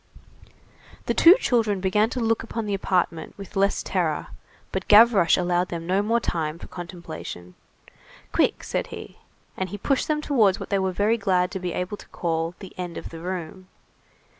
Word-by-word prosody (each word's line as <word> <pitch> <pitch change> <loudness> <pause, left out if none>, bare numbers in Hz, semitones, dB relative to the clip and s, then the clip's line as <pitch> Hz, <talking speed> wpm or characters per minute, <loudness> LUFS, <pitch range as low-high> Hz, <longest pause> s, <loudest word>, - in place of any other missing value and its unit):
The - - 0
two 340 +3 +8
children 225 - +1
began 210 +4 +2
to 255 - -4
look 225 -1 +1
upon 230 -1 -4
the 205 - -2
apartment 180 -4 -1
with 200 +1 -10
less 195 +1 +1
terror; - - -1 0.4
but - - -3
Gavroche 210 -5 +6
allowed 180 0 +1
them 165 -1 -5
no 190 +3 +2
more 230 +3 +1
time 160 -6 -2
for - - -10
contemplation. 170 - -8 0.8
"Quick," - - +1
said - - -2
he. - - -10 0.4
And 190 0 -3
he 205 - -6
pushed 270 +6 0
them 305 -1 +1
towards 230 -11 +2
what - - -8
we 200 - +3
are 190 0 0
very 205 +5 +1
glad 185 -3 +1
to 190 - -4
be 180 -2 -3
able 180 +3 -3
to - - -14
call 165 0 -2
the 190 -3 -11
end 175 -2 -5
of - - -7
the 165 - -9
room. 185 +1 -6
190 Hz, 185 wpm, -24 LUFS, 175-210 Hz, 0.8 s, two